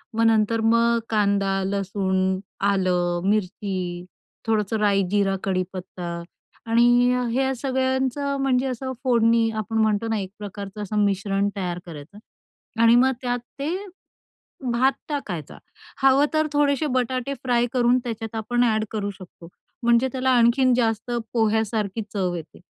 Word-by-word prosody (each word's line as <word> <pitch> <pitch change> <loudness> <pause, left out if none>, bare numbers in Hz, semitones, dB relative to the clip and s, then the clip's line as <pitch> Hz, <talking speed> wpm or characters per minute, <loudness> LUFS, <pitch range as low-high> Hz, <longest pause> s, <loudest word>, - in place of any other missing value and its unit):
मग 230 - +2
नंतर 225 0 +3
मग 230 +1 +3
कांदा, 200 -2 +1
लसूण, 190 -1 0 0.3
आलं, 180 -3 +1
मिरची, 185 -3 -2 0.4
थोडंसं 220 -1 +1
राई, 200 -2 +3
जीरा, 200 -2 +2
कडीपत्ता 185 -2 -3 0.5
आणि 240 +2 +4
अ, 250 - -1
ह्या 265 +2 +1
सगळ्यांचं 265 +2 -1
म्हणजे 265 -1 +2
असं 260 +1 -4
फोडणी 230 -2 +3
आपण 220 +1 -3
म्हणतो 220 0 +1
ना 220 - 0
एक 190 -2 -5
प्रकारचं 205 0 -7
असं 210 +1 0
मिश्रण 200 0 0
तयार 180 -3 -3
करायचं 165 +4 -11 0.6
आणि 230 +1 +6
मग 260 +2 +5
त्यात 245 -1 -1 0.2
ते 310 +5 -1 1.0
भात 255 +3 +3 0.2
टाकायचा. 185 - -5 0.5
हवं 270 +2 +5
तर 310 0 +2
थोडेसे 290 +1 +2
बटाटे 255 +2 -1
फ्राय 240 -1 +2
करून 245 0 +3
त्याच्यात 225 -2 -5
आपण 240 +3 0
ॲड 220 -2 +1
करू 205 -2 -2
शकतो, 185 -3 -14 0.4
म्हणजे 235 +2 +4
त्याला 260 0 -1
आणखीन 245 +2 +4
जास्त 230 0 0 0.2
पोह्यासारखी 220 -2 0
चव 185 -4 -1
येते 160 -2 -9
220 Hz, 135 wpm, -23 LUFS, 195-245 Hz, 1.0 s, आणि